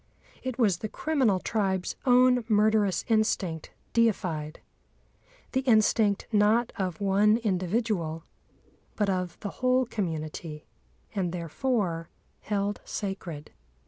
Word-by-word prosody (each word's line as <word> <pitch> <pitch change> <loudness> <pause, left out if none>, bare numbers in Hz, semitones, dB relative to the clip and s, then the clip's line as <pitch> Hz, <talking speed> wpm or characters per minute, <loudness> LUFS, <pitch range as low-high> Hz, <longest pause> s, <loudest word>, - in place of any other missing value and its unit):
It 255 -2 -4
was 210 -8 +3
the 215 - -4
criminal 265 -11 +1
tribe's 190 -2 -1
own 250 0 +5
murderous 210 -2 +3
instinct 195 -7 0 0.2
deified—the 180 -10 0 1.0
instinct, 215 -4 +3
not 215 +3 +3
of 185 -6 -3
one 200 +2 +4
individual, 185 -5 -1 0.7
but 205 -2 +1
of 180 -2 -3
the 205 - -3
whole 255 0 +3
community, 160 -6 -4 0.5
and 185 -5 -1
therefore 175 - -2 0.3
held 205 0 -2
sacred. 180 -7 -5
205 Hz, 100 wpm, -28 LUFS, 180-225 Hz, 1.0 s, own